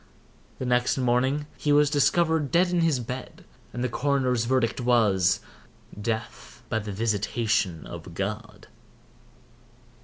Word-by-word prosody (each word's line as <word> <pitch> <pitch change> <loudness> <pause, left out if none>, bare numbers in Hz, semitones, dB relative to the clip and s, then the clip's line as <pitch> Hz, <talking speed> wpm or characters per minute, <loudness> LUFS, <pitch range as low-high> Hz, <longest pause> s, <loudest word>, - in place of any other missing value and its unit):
The 130 - -4
next 125 +1 +1
morning 130 +3 +1
he 150 - 0
was 145 0 +4
discovered 160 0 +2
dead 175 +2 +3
in 175 -1 +2
his 160 -6 +2
bed, 125 +2 -7 0.3
and 120 +2 -4
the - - +1
coroner's 125 -2 0
verdict 125 -1 0
was—"Death 110 0 -1
by 110 - 0
the 105 -1 -6
visitation 105 - -1
of - - -9
God." - - -5
125 Hz, 120 wpm, -26 LUFS, 110-145 Hz, 0.3 s, was